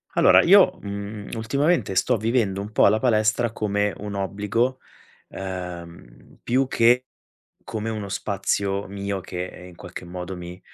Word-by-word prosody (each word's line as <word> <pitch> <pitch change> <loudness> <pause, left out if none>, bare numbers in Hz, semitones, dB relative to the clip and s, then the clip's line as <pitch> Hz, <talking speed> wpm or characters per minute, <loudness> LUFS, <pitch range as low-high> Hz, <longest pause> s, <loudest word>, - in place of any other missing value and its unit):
Allora - - +6
io, - - +6
mhmm, 100 +1 -6
ultimamente 130 - 0
sto 125 +6 +2
vivendo 110 -3 0
un 105 +2 -7
po' - - +5
la 105 +2 +3
palestra 110 -1 +2
come 105 -2 -1
un 105 0 -6
obbligo, 105 +6 -1 0.5
uhm, 85 -9 -8
più 130 +2 +1
che 125 +1 +3 0.6
come 110 0 -4
uno 105 -2 -4
spazio 100 0 -1
mio 100 0 -4
che, 90 0 -7
in 90 - -14
qualche 90 +1 -9
modo 90 +1 -6
mi, 90 +1 -9
100 Hz, 140 wpm, -24 LUFS, 95-110 Hz, 0.6 s, Allora